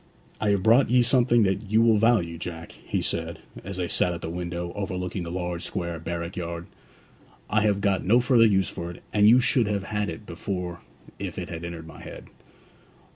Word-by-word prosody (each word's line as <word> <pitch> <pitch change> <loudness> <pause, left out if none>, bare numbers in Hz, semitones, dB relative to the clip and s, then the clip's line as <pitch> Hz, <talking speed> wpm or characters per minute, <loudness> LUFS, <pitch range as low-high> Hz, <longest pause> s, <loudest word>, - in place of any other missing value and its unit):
'I 105 - +1
have 100 -2 +2
brought 115 +6 +5
ye 125 0 +5
something 120 -2 +4
that 100 +1 -1
you 110 +2 +4
will 110 -2 +4
value, 100 -8 +2
Jack,' 85 -1 -6
he - - -4
said, 80 0 -2 0.3
as 100 +1 -6
they 90 -1 -1
sat 90 +1 +1
at 85 - -7
the 80 - -4
window, 85 0 -4
overlooking 95 -2 -3
the 85 - -5
large 90 -1 -3
square 85 -3 -3
barrack 85 +2 -5
yard. 85 -1 -5 0.9
'I 105 0 +3
have 105 -2 +1
got 100 -2 +1
no 115 +6 +4
further 120 -2 +5
use 95 -4 +2
for 85 +1 -6
it, 85 - -11
and 105 0 +6
you 120 +3 +7
should 120 -2 +3
have 100 -2 -1
had 105 0 -2
it 110 - -8
before 90 -1 -5 0.4
if - - -5
it - - -5
had 80 0 -6
entered 85 -1 -6
my 80 - -12
head.' - - -10
95 Hz, 205 wpm, -26 LUFS, 85-105 Hz, 0.9 s, you